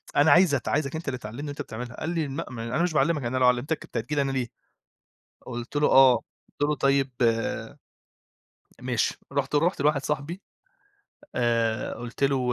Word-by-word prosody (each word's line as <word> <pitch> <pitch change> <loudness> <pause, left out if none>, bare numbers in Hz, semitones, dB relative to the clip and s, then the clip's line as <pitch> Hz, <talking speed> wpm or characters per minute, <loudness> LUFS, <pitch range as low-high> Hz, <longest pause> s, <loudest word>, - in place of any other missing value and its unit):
أنا 145 +1 +5
عايز 175 -3 +6
ات 125 - -3
عايزك 145 0 0
أنت 160 -1 -6
اللي 130 -2 -1
تعلمني 120 +6 -7
وأنت 145 - -5
بتعملها،" 120 +2 -7
قال 160 - -3
لي: 165 -4 -1
"لأ 145 +5 -4
ما 115 -2 -6
أنا 125 +9 0
مش 175 -3 0
باعلمك 150 0 +2
أنا 125 +2 -1
لو 125 -1 +4
علّمتك 125 +6 +1
كنت - - -7
هتيجي 150 - -2
لي 145 - +3
أنا 135 -1 0
ليه؟" 130 -3 -1 1.0
قُلت 120 +3 -6
له: 150 - +3
آه،" 130 -2 +7 0.4
قُلت - - -8
له: - - +2
"طيب 135 -1 +2 1.7
ماشي،" - - 0
رُحت - - -1
رُحت 165 +2 +2
لواحد 145 -1 +2
صاحبي 150 +6 -3 0.9
آآ، 115 -2 0
قُلت 120 +3 -3
له 130 -3 +1
140 Hz, 180 wpm, -26 LUFS, 125-150 Hz, 1.7 s, آه